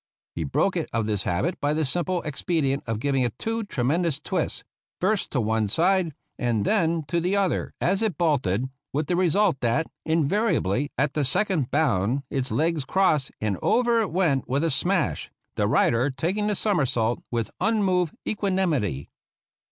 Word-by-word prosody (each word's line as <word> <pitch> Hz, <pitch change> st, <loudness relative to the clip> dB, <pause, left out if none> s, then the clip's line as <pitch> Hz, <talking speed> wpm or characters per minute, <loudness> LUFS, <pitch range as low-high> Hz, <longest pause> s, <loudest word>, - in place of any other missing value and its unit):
He 85 Hz, -, -3 dB
broke 70 Hz, -, +1 dB
it -, -, -2 dB
of 115 Hz, -1 st, 0 dB
this 105 Hz, -2 st, -1 dB
habit 125 Hz, -, -1 dB
by 145 Hz, +1 st, +1 dB
the 155 Hz, 0 st, +1 dB
simple 175 Hz, +5 st, -1 dB
expedient 145 Hz, -2 st, -1 dB
of 115 Hz, -1 st, -1 dB
giving 135 Hz, +1 st, +1 dB
it 120 Hz, -2 st, -1 dB
two 225 Hz, 0 st, -2 dB
tremendous 155 Hz, -, 0 dB
twists, 180 Hz, -1 st, -2 dB, 0.4 s
first 200 Hz, +2 st, 0 dB
to 135 Hz, -, -1 dB
one 110 Hz, -1 st, +1 dB
side 170 Hz, -, +1 dB, 0.2 s
and 115 Hz, -4 st, 0 dB
then 165 Hz, -6 st, +1 dB
to 170 Hz, +4 st, -1 dB
the 180 Hz, +4 st, 0 dB
other, 195 Hz, -3 st, 0 dB
as 190 Hz, +3 st, +1 dB
it 220 Hz, -5 st, 0 dB
bolted, 130 Hz, -, +1 dB, 0.3 s
with 150 Hz, +2 st, 0 dB
the 175 Hz, -, 0 dB
result 185 Hz, -2 st, +2 dB
that, 120 Hz, +6 st, +1 dB, 0.2 s
invariably, 160 Hz, -, +1 dB
at 135 Hz, +1 st, +1 dB
the 150 Hz, -, 0 dB
second 155 Hz, -, 0 dB
bound 135 Hz, -3 st, +1 dB
its 135 Hz, 0 st, -1 dB
legs 160 Hz, -1 st, +1 dB
crossed 155 Hz, -3 st, +2 dB
and 105 Hz, -4 st, -1 dB
over 235 Hz, -1 st, +3 dB
it 210 Hz, -, -1 dB
went 160 Hz, -7 st, +1 dB
with 140 Hz, +4 st, +1 dB
a 165 Hz, -, +1 dB
smash, 170 Hz, -, 0 dB, 0.2 s
the -, -, 0 dB
rider 120 Hz, +4 st, +3 dB
taking 185 Hz, +10 st, -1 dB
the 210 Hz, -, +1 dB
somersault 130 Hz, -, +1 dB
with 115 Hz, -2 st, -2 dB
unmoved 190 Hz, -5 st, +1 dB
equanimity. 175 Hz, -, 0 dB
155 Hz, 165 wpm, -25 LUFS, 125-185 Hz, 0.4 s, over